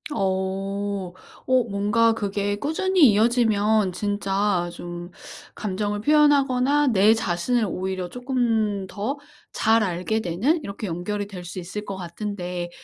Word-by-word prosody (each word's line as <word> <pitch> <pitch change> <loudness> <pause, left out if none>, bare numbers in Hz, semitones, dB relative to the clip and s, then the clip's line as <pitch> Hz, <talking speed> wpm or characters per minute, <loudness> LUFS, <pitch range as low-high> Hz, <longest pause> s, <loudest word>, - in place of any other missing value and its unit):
어. 195 0 -2 0.3
어 255 -1 +3
뭔가 210 +3 +2
그게 205 -1 -2
꾸준히 320 - +3
이어지면 215 -2 +2
진짜 200 -2 0
좀 175 0 -8 0.4
감정을 205 +1 -2
표현하거나 290 -1 +3
내 215 -2 +5
자신을 220 +3 0
오히려 185 -1 -3
쪼끔 230 -6 -1
더 215 +10 -3 0.3
잘 225 0 +3
알게 185 +4 -1
되는 220 - 0
이렇게 200 +2 -6
연결이 200 +3 -3
될 190 -3 -9
수 180 +2 -9
있을 185 +4 -5
것 200 -2 -6
같은데 180 -1 -5
205 Hz, 250 characters per minute, -24 LUFS, 190-230 Hz, 0.4 s, 내